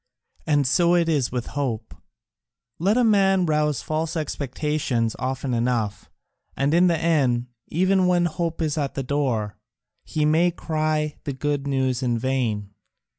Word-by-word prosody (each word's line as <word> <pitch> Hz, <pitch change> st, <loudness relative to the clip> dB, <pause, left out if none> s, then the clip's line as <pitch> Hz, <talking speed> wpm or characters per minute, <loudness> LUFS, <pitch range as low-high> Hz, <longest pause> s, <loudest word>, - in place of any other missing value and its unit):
And 145 Hz, -2 st, +3 dB
so 170 Hz, +7 st, +3 dB
it 170 Hz, -1 st, +2 dB
is 145 Hz, -6 st, +1 dB
with 125 Hz, -1 st, -3 dB
hope. 120 Hz, -6 st, -3 dB, 0.9 s
Let 200 Hz, +7 st, +2 dB
a 250 Hz, -, +4 dB
man 195 Hz, -4 st, +4 dB
rouse 150 Hz, -3 st, 0 dB
false 155 Hz, +2 st, -2 dB
expectations 140 Hz, -5 st, -1 dB
often 130 Hz, 0 st, -2 dB
enough, 115 Hz, -4 st, -1 dB, 0.5 s
and 140 Hz, +2 st, +1 dB
in 175 Hz, +2 st, +5 dB
the 170 Hz, -2 st, +2 dB
end, 135 Hz, -7 st, +1 dB, 0.2 s
even 185 Hz, +2 st, +2 dB
when 175 Hz, -1 st, +3 dB
hope 165 Hz, 0 st, -2 dB
is 155 Hz, 0 st, -1 dB
at 140 Hz, -2 st, -2 dB
the 135 Hz, -, -2 dB
door, 125 Hz, -7 st, -1 dB, 0.5 s
he 155 Hz, -1 st, -1 dB
may 160 Hz, +4 st, +4 dB
cry 155 Hz, -2 st, -1 dB
the 140 Hz, -, -2 dB
good 145 Hz, +1 st, -2 dB
news 130 Hz, -2 st, 0 dB
in 120 Hz, -2 st, 0 dB
vain. 115 Hz, -5 st, -1 dB
145 Hz, 150 wpm, -24 LUFS, 125-165 Hz, 0.9 s, in